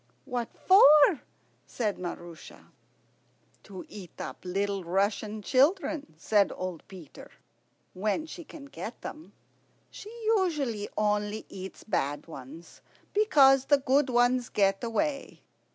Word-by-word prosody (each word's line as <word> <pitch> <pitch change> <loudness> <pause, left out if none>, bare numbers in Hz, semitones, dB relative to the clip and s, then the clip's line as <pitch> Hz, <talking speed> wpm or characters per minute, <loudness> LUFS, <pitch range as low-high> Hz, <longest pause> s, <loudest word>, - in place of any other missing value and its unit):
"What 245 -2 -3
for?" 305 -4 +6 0.5
said 215 -4 -2
Maroosia. 175 -2 -9 0.9
"To 190 -3 -10
eat 190 -5 -12
up - - -7
little 195 +1 -2
Russian 200 +4 -1
children," 285 - +1
said 200 +3 +2
old 185 -3 -5
Peter, 180 -7 -12 0.6
"when 210 - -1
she 340 +2 -9
can 300 -2 -12
get 245 -4 -8
them. 310 +2 -9 0.6
She 415 - -10 0.3
usually 275 - -2
only 210 0 -1
eats 190 0 -9
bad 145 -8 -2
ones, 155 +2 -12 0.3
because 275 -11 +5
the 285 - +4
good 275 0 +1
ones 245 0 +2
get 195 0 +1
away. 275 +5 -3
220 Hz, 115 wpm, -28 LUFS, 190-280 Hz, 0.9 s, for